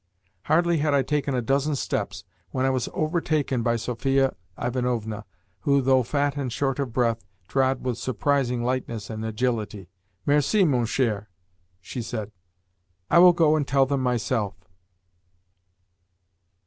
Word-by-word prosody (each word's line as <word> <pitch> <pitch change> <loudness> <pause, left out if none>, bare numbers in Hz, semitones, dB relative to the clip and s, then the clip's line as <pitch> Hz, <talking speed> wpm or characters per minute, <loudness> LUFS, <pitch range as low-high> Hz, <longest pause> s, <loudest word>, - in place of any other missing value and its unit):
Hardly 170 +1 +3
had 145 -1 +2
I 135 - +3
taken 145 0 -1
a 125 - 0
dozen 140 +4 +1
steps - - -3 0.3
when 130 0 -1
I 135 - +3
was 130 -2 -1
overtaken 155 -5 0
by 120 0 +1
Sophia 135 +3 0 0.2
Ivanovna, 120 -4 -2 0.3
who, 140 +8 +2
though 130 0 +4
fat 140 +3 0
and 135 -3 -2
short 135 +2 -1
of 135 -4 -2
breath, 115 -2 0 0.2
trod 130 +3 +1
with 120 -2 -1
surprising 130 -1 0
lightness 120 -3 -3
and 110 0 -5
agility. 110 -4 -2 0.3
"Merci, 150 +8 +3
mon 125 -7 +2
cher," 110 -4 -1 0.5
she 120 +7 -6
said. 110 -2 -5 0.8
"I - - +7
will 180 0 +8
go 160 -2 +4
and 145 -3 0
tell 135 0 +4
them 135 0 -1
myself." 120 -4 0
130 Hz, 140 wpm, -25 LUFS, 115-140 Hz, 0.8 s, will